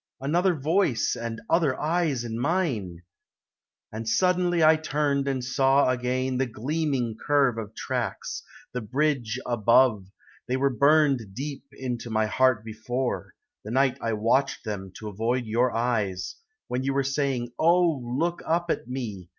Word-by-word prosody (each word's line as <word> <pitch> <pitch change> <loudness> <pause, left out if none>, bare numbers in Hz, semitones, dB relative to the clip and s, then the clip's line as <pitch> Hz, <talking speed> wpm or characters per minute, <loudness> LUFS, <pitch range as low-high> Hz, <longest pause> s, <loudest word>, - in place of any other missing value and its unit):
Another 175 +6 +2
voice 155 - +1
and 115 -1 -5
other 160 -6 +2
eyes 155 -5 0
in 115 -1 -4
mine! 120 - -1 0.9
And 110 +1 -4
suddenly 180 +1 +2
I 155 +1 +7
turned 145 -2 0
and 130 -2 -1
saw 135 0 +3
again 130 +1 -1
The 135 - +1
gleaming 130 -1 -2
curve 140 -5 +2
of 110 -1 -7
tracks, - - -3 0.3
the 125 - -2
bridge 130 -1 0
above 115 -3 +3 0.4
They 130 - 0
were 140 +1 +2
burned 140 -6 +3
deep 140 +2 -5
into 125 -2 -5
my 110 -1 +1
heart 120 0 +2
before, 120 +4 -3 0.3
The 105 - -8
night 130 +2 +2
I 115 - -1
watched 115 +6 +1
them 95 -3 -5
to 110 - -7
avoid 115 +5 -1
your 120 +3 +1
eyes, 110 -6 -1 0.3
When 125 - -2
you 135 +1 -1
were 140 - +2
saying, 135 -3 -1
"Oh, 170 -2 +4
look 155 +9 -1
up 170 +1 +1
at - - -3
me!" 110 -9 -5
130 Hz, 150 wpm, -26 LUFS, 115-145 Hz, 0.9 s, I